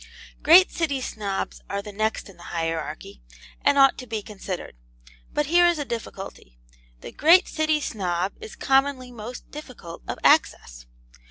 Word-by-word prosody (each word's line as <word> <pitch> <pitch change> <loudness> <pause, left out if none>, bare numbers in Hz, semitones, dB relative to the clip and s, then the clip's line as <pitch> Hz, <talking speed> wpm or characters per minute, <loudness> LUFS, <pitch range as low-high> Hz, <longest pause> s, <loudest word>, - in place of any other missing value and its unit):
Great 360 +4 +7
City 300 -5 -1
Snobs 205 -6 -4
are 200 0 -3
the 210 - -8
next 215 +3 -2
in 195 - -14
the - - -18
hierarchy, 160 - -4 0.4
and 280 - +4
ought 270 -1 +5
to 255 - -8
be 220 -2 -4
considered. 195 - -7 0.6
But 295 - 0
here 350 +4 +5
is 345 -1 +2
a 290 - -3
difficulty. 195 - -7 0.4
The - - -8
great 340 - +5
City 310 -1 0
Snob 185 -7 -2
is 445 +1 -10
commonly 270 - +1
most 240 +1 -9
difficult 255 - -10
of - - -4
access. - - +2
230 Hz, 155 wpm, -24 LUFS, 190-295 Hz, 0.6 s, Great